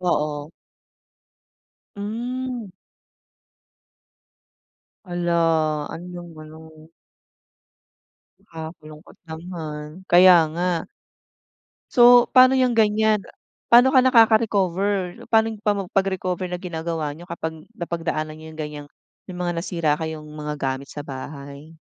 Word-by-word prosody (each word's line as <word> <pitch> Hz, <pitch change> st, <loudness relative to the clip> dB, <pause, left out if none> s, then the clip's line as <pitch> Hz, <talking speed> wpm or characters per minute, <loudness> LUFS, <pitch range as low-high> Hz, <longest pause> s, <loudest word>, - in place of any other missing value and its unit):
Oo. 150 Hz, -4 st, -1 dB, 1.5 s
Mm. 240 Hz, +2 st, -4 dB, 2.4 s
Hala! 175 Hz, -1 st, -1 dB, 0.6 s
Ano 165 Hz, -, -8 dB
'yong 175 Hz, -1 st, -9 dB
ano. 155 Hz, 0 st, -14 dB, 1.5 s
Nakakalungkot 160 Hz, -1 st, -11 dB
naman, 160 Hz, -2 st, -7 dB, 0.2 s
kaya 180 Hz, 0 st, +8 dB
nga. 180 Hz, +2 st, -1 dB, 1.2 s
So, 245 Hz, -1 st, +7 dB
paano 255 Hz, +1 st, +7 dB
yung 250 Hz, -2 st, +2 dB
ganyan. 215 Hz, -1 st, +2 dB, 0.5 s
Paano 245 Hz, +3 st, +6 dB
ka 260 Hz, -, +7 dB
nakaka-recover? 205 Hz, -6 st, +2 dB
Paano 225 Hz, -1 st, +4 dB
yung 210 Hz, -, -15 dB
pa 210 Hz, -1 st, +2 dB, 0.2 s
pag-recover 190 Hz, -2 st, -1 dB
na 180 Hz, -, -3 dB
ginagawa 165 Hz, -4 st, -4 dB
niyo 175 Hz, +3 st, -13 dB
kapag 160 Hz, -1 st, -6 dB
napagdaanan 165 Hz, -4 st, -3 dB
niyo 160 Hz, -, -12 dB
yung -, -, -15 dB
ganyang 150 Hz, -1 st, -7 dB, 0.4 s
may 185 Hz, -, -8 dB
mga 175 Hz, -1 st, -2 dB
nasira 165 Hz, -4 st, -1 dB
kayong 160 Hz, -1 st, -5 dB
mga 150 Hz, 0 st, -5 dB
gamit 135 Hz, 0 st, -3 dB
sa 145 Hz, -, -7 dB
bahay? 140 Hz, +3 st, -9 dB
175 Hz, 100 wpm, -22 LUFS, 155-205 Hz, 2.4 s, kaya